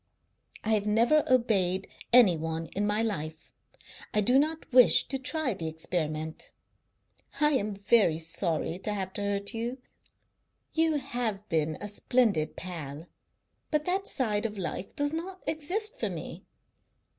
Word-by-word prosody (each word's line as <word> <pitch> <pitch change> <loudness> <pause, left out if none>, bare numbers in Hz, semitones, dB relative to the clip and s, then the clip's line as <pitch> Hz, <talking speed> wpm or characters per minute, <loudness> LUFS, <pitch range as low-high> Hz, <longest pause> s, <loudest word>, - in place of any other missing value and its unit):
I 215 - -2
have 215 -2 +2
never 235 +8 +4
obeyed 195 -7 +2 0.2
any 235 -8 +7
one 160 +1 -3
in 205 +1 0
my 210 +2 +1
life; 160 -7 -4 0.6
I 210 - +5
do 250 +6 +4
not 315 +2 0
wish 250 -1 +6
to 270 - -1
try 275 -1 -1
the 165 -4 -5
experiment. 160 -1 -3 0.9
I 300 0 +4
am 210 -7 0
very 200 -4 +3
sorry 165 +1 -1
to 210 +2 -3
have 190 -2 -3
hurt 200 0 -2
you. 235 +3 -3 1.0
You've 315 -4 +1 0.4
been 155 -1 0
a 205 - -5
splendid 205 -6 +1
pal, 160 -4 -7 0.6
but 305 -1 0
that 385 +2 -1
side 220 - 0
of 210 -1 -10
life 190 0 -5
does 290 -1 0
not 370 +3 -5
exist 370 +8 -1
for - - 0
me. - - -7
210 Hz, 140 wpm, -29 LUFS, 170-265 Hz, 1.0 s, any